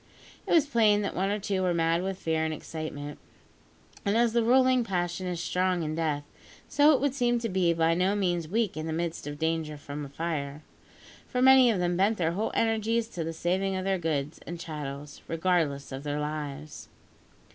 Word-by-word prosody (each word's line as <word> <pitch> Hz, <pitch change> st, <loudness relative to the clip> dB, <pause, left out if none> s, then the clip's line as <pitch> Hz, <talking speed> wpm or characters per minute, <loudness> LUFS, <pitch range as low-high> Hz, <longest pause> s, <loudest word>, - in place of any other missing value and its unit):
It -, -, -3 dB
was 325 Hz, -4 st, +5 dB
plain 215 Hz, -6 st, +3 dB
that 200 Hz, -, -3 dB
one 190 Hz, +2 st, 0 dB
or 205 Hz, -, 0 dB
two 195 Hz, -2 st, -1 dB
were 180 Hz, -2 st, +1 dB
mad 165 Hz, +1 st, +2 dB
with 190 Hz, 0 st, -3 dB
fear 160 Hz, -3 st, 0 dB
and 160 Hz, -, -1 dB
excitement; 150 Hz, -2 st, -6 dB, 0.8 s
and 200 Hz, +2 st, +1 dB
as 235 Hz, -1 st, +3 dB
the 235 Hz, -, +3 dB
ruling 255 Hz, +1 st, +4 dB
passion 180 Hz, -2 st, -2 dB
is 175 Hz, -2 st, -3 dB
strong 180 Hz, 0 st, 0 dB
in 155 Hz, 0 st, -2 dB
death, 155 Hz, -3 st, -1 dB, 0.4 s
so 290 Hz, +2 st, +5 dB
it 275 Hz, -, +2 dB
would 280 Hz, -1 st, +1 dB
seem 240 Hz, -3 st, +2 dB
to 235 Hz, 0 st, -2 dB
be 185 Hz, -4 st, +2 dB
by 165 Hz, 0 st, +2 dB
no 185 Hz, +4 st, +1 dB
means 175 Hz, -5 st, 0 dB
weak 215 Hz, +2 st, 0 dB
in 155 Hz, +1 st, -4 dB
the 160 Hz, -, -2 dB
midst 165 Hz, -2 st, -3 dB
of 145 Hz, 0 st, -5 dB
danger 160 Hz, -1 st, -1 dB
from 145 Hz, 0 st, -7 dB
fire; 150 Hz, -1 st, -4 dB, 0.6 s
for 250 Hz, -, -2 dB
many 260 Hz, -1 st, +7 dB
of 220 Hz, -, +2 dB
them 175 Hz, -1 st, 0 dB
bent 205 Hz, +4 st, +2 dB
their 165 Hz, -2 st, +1 dB
whole 205 Hz, +6 st, -1 dB
energies 225 Hz, 0 st, +1 dB
to 175 Hz, -7 st, -4 dB
the 165 Hz, -, -3 dB
saving 190 Hz, +4 st, -1 dB
of 185 Hz, 0 st, -3 dB
their 195 Hz, -1 st, +1 dB
goods 150 Hz, -3 st, -2 dB
and 170 Hz, 0 st, -5 dB
chattels 145 Hz, -3 st, -7 dB
regardless 165 Hz, -5 st, 0 dB
of 135 Hz, 0 st, -5 dB
their 145 Hz, 0 st, -3 dB
lives. 150 Hz, 0 st, -5 dB
175 Hz, 200 wpm, -28 LUFS, 155-205 Hz, 0.8 s, many